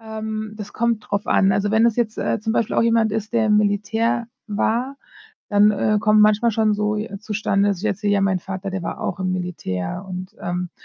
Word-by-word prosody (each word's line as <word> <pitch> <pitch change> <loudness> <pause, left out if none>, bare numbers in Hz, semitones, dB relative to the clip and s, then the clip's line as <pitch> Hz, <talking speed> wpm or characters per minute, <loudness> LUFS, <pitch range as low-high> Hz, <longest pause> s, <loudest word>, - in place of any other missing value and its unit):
Ähm, 220 -1 -5
das 210 -1 -8
kommt 235 -1 0
darauf 200 0 -2
an. 195 0 +3
Also, 205 +1 0
wenn 220 +2 +4
es 230 - +1
jetzt, 230 -3 -1
äh, - - -1
zum 220 +1 -1
Beispiel 230 -1 0
auch - - +4
jemand 230 -2 +2
ist, 220 0 -3
der 230 -2 +2
im 210 -1 +4
Militär 210 +3 +1 0.2
war, 230 +5 -1 0.5
dann, 205 0 +5
äh, 210 +1 +1
kommt 215 0 +4
manchmal 215 +2 +4
schon 220 -1 +2
so, 210 0 0
äh, 210 -2 -5
zustande, 205 -1 0
dass 195 -2 -2
jetzt 210 -2 -1
so: 210 - -4
„Ja, 205 0 +3
mein 195 -1 +2
Vater, 190 +2 -6
der 190 -1 -4
war - - -5
auch - - -3
im 185 0 0
Militär“, 175 - -4
und 185 0 -7
ähm, 180 0 -3
210 Hz, 220 wpm, -21 LUFS, 195-220 Hz, 0.5 s, dann